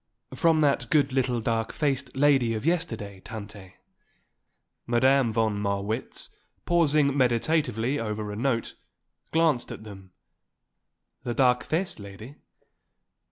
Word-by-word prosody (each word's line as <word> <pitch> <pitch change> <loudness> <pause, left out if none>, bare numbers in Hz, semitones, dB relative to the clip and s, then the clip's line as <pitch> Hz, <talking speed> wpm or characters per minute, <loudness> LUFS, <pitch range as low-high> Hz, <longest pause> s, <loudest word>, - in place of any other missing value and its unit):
"From 165 -2 +3
that 145 -2 +1
good 145 -4 +3
little 125 -2 +1
dark 115 0 -1
faced 135 -3 -2
lady 135 -5 +3
of 110 +4 -5
yesterday, 115 - -2
Tante." 100 -3 -10 1.1
Madame 130 +1 +3
von 110 -2 0
Marwitz, 100 +3 -3 0.4
pausing 150 -5 +3
meditatively 130 0 +1
over 105 -1 -3
a - - -5
note, 115 0 -1 0.6
glanced 160 -6 +2
at - - -8
them. 95 -3 -12 1.1
"The 120 - -4
dark 125 -2 +3
faced 175 - -2
lady?" 105 +7 -10
120 Hz, 115 wpm, -26 LUFS, 110-145 Hz, 1.1 s, From